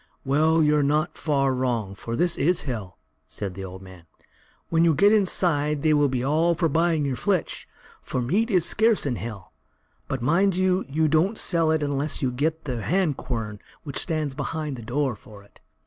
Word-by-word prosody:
"Well, 155 +4 +3
you're 150 0 +3
not 150 +3 0
far 135 -3 +1
wrong, 120 -6 -1
for 115 +3 -5
this 175 +5 +2
is 175 +4 +1
Hell," 110 -10 -5 0.3
said 100 +3 -5
the 95 +1 -7
old 95 0 -9
man; 90 -3 -14 0.6
"when 165 0 +3
you 165 -2 +4
get 200 +7 +5
inside 150 -8 +1
they 155 -1 +4
will 145 -1 +3
be 130 -2 -2
all 160 +5 +2
for 165 +1 +1
buying 160 0 +1
your 135 -2 -1
flitch, 190 +3 -2 0.3
for 130 - -3
meat 195 - 0
is 180 -6 +3
scarce 220 -3 +3
in 125 -5 -1
Hell; 110 -5 -8 0.5
but, 130 -3 -3
mind 175 +7 +2
you 185 0 +1 0.2
don't 165 +8 +2
sell 165 -3 +2
it 160 -1 +1
unless 145 +1 -1
you 130 -3 0
get 155 +6 -1
the 125 -5 -3
hand 175 - 0
quern 110 -4 -4 0.2
which 140 -3 -4
stands 155 -4 -2
behind 150 0 -4
the 120 - -9
door 125 +2 -1
for 105 0 -15
it. 100 - -24
150 Hz, 190 wpm, -24 LUFS, 125-165 Hz, 0.6 s, get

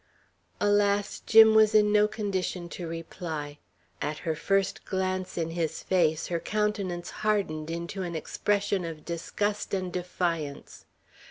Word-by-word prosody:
Alas, 205 0 +2
Jim 220 -1 +8
was 220 0 +5
in 210 -1 +5
no 210 0 +5
condition 190 -5 -3
to 170 0 -6
reply. 160 -3 -6 0.4
At 150 0 -2
her 160 - +1
first 195 +4 0
glance 185 -1 -2
in 165 -1 -1
his 165 -2 -2
face, 160 -4 +2
her 170 -1 -2
countenance 200 -4 -2
hardened 190 -8 0
into 170 +4 -4
an 175 -2 -4
expression 200 +3 0
of 165 -2 -7
disgust 205 +5 -2
and 185 -2 -3
defiance. 170 -5 -3
185 Hz, 135 wpm, -28 LUFS, 165-205 Hz, 0.4 s, Jim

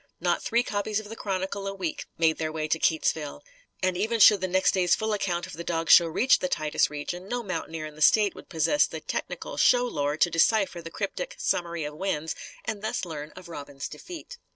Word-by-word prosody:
Not 175 0 +1
three 235 +1 +1
copies 210 -1 -1
of 210 -1 -10
the 225 - -7
Chronicle 195 -1 -3
a 195 - -4
week 180 -5 -4
made 160 -1 +2
their 155 -1 -1
way 155 -1 -3
to 160 +1 0
Keytesville. 155 -2 0 0.4
And, 185 -1 +2
even 220 +5 0
should 205 -2 +8
the 185 - 0
next 190 +1 +3
day's 180 -3 +3
full 220 0 -1
account 175 -4 -1
of - - -10
the 170 - -6
dog 165 -2 0
show 170 - +8
reach 240 +11 +3
the 185 - -1
Titus 155 -3 +1
region, 175 +5 -5
no 245 +2 -2
mountaineer 165 -6 -4
in 155 - -8
the 155 - -13
State 205 +6 +5
would - - -13
possess 165 - +3
the - - -6
technical - - -5
show 245 0 +5
lore 145 -9 -1
to 175 +2 +3
decipher 185 +1 +2
the 165 - -8
cryptic 360 - -4
"summary 170 -2 -1
of 150 0 -5
wins" 160 -2 -2 0.3
and 215 -2 -3
thus 220 -3 -2
learn 150 -3 -6
of 185 -1 -11
Robin's 145 -4 -7
defeat. 365 +8 -10
180 Hz, 220 wpm, -27 LUFS, 160-205 Hz, 0.4 s, should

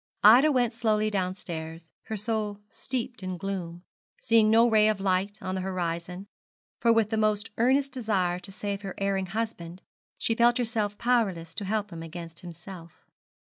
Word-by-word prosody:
Ida 250 +9 +8
went 245 -3 +1
slowly 215 -2 +1
downstairs, 170 -4 -4
her 220 - -4
soul 210 -1 -2
steeped 250 -3 -4
in 185 -1 -4
gloom, 175 -2 -5 0.4
seeing 225 -3 +4
no 230 +2 +6
ray 215 -2 +4
of 215 -2 +1
light 195 +1 0
on 185 0 -3
the 190 - -2
horizon; 180 0 -3 0.5
for 230 - +4
with 225 -1 +2
the 220 - 0
most 215 0 +1
earnest 270 +3 +3
desire 195 -8 0
to 195 - -10
save 200 0 -4
her 195 -2 -6
erring 195 -1 -1
husband, 185 -4 -5 0.3
she 225 - 0
felt 235 +1 +4
herself 220 -4 -1
powerless 195 -10 0
to 205 - -4
help 205 0 -2
him 165 - -7
against 165 0 -8
himself. 175 -1 -11
205 Hz, 165 wpm, -27 LUFS, 180-225 Hz, 0.5 s, Ida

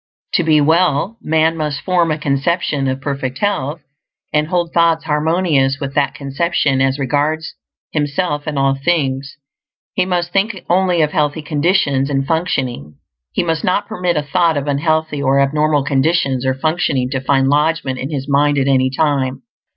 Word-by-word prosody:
To 175 - +3
be 155 -2 +4
well, 170 +6 +2
man 160 -1 +1
must 150 -3 -3
form 180 -3 +1
a 155 - 0
conception 145 0 0
of 130 +1 -2
perfect 135 -2 -3
health, 155 -6 -1 0.5
and 150 0 +1
hold 175 -1 -1
thoughts 165 -2 +3
harmonious 150 -3 +1
with 140 -1 -4
that 140 -2 0
conception 140 -1 0
as 135 0 +1
regards 150 +4 -1 0.4
himself 150 0 -2
and 150 -2 -3
all 135 0 +2
things. 135 -2 -1 0.6
He 185 -1 0
must 175 -1 -1
think 200 0 0
only 180 -2 +2
of 150 - 0
healthy 150 0 0
conditions 145 -3 +1
and 135 -1 0
functioning; 130 - -2 0.4
he - - 0
must 165 -2 -1
not 185 +2 +1
permit 180 -6 -1
a 150 - 0
thought 165 +1 +1
of 140 - -2
unhealthy 155 +1 0
or 135 0 +2
abnormal 150 +1 +2
conditions 135 -2 +1
or 130 - +1
functioning 140 -3 0
to 135 -1 -2
find 135 0 +2
lodgment 145 -2 +1
in 135 - -4
his 140 -3 -4
mind 145 +1 +2
at 135 -1 +1
any 130 -1 +3
time. 135 -2 -1
150 Hz, 165 wpm, -17 LUFS, 135-165 Hz, 0.6 s, be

